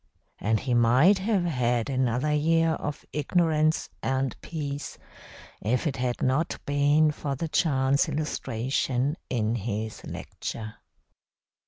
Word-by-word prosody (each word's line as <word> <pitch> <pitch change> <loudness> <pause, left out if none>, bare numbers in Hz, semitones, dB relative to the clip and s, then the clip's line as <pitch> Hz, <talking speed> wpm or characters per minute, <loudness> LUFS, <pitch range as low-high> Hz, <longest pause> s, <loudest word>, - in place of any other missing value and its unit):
And 110 +1 +1
he 125 - -1
might 125 - +5
have 200 -1 +1
had 125 -7 +1
another 130 +2 0
year 165 +2 +3
of 150 -2 -4
ignorance 155 0 +2
and 130 -1 -1
peace 145 -3 -5 0.6
if 120 +4 0
it 140 -3 -1
had 125 -1 -1
not 135 +6 +1
been 145 +2 +3
for 145 -2 -3
the 165 +5 -3
chance 140 -2 +2
illustration 135 -2 -1
in 110 -3 0
his 110 -1 -4
lecture. 110 -2 -6
140 Hz, 120 wpm, -27 LUFS, 125-155 Hz, 0.6 s, might